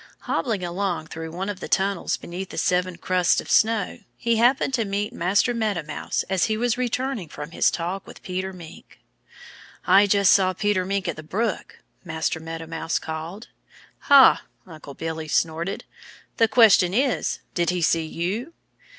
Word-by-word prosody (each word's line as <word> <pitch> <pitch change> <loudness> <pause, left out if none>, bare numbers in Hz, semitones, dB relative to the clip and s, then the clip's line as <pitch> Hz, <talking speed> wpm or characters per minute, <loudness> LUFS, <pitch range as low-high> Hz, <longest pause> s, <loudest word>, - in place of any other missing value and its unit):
Hobbling 220 -7 -2
along 175 -1 -2
through 160 0 -7
one 180 +4 -5
of 205 -3 -4
the - - -6
tunnels 195 -1 0
beneath 180 +2 -7
the - - -9
seven 180 -1 0
crusts 180 0 +2
of - - -6
snow 220 -2 +2 0.2
he 235 -1 +1
happened 255 +3 +3
to 235 -3 +1
meet 205 0 -3
Master 195 +8 +1
Meadow 215 -7 -1
Mouse 155 - -3
as 190 -1 +1
he 215 -1 -1
was 240 0 +1
returning 250 - -2
from 150 +2 -8
his - - +3
talk 180 +3 -4
with - - -13
Peter 185 +1 -3
Mink. 175 -4 -13 0.9
"I 200 +1 +6
just 200 -1 +5
saw 185 -1 +3
Peter 195 -1 0
Mink 195 0 -2
at - - -3
the - - -6
brook!" 205 +7 -3 0.2
Master 160 -1 -2
Meadow 165 0 -7
Mouse 165 0 -2
called. 160 +7 -6 0.5
"Ha!" 275 -2 +7 0.2
Uncle 155 -5 -11
Billy 160 -1 -5
snorted. 165 +4 -1 0.5
"The 225 - +4
question 205 -6 +5
is, 260 0 +1 0.2
did 170 -1 0
he 180 -1 -1
see 160 0 +2
you?" 200 - -3
185 Hz, 165 wpm, -24 LUFS, 165-215 Hz, 0.9 s, Ha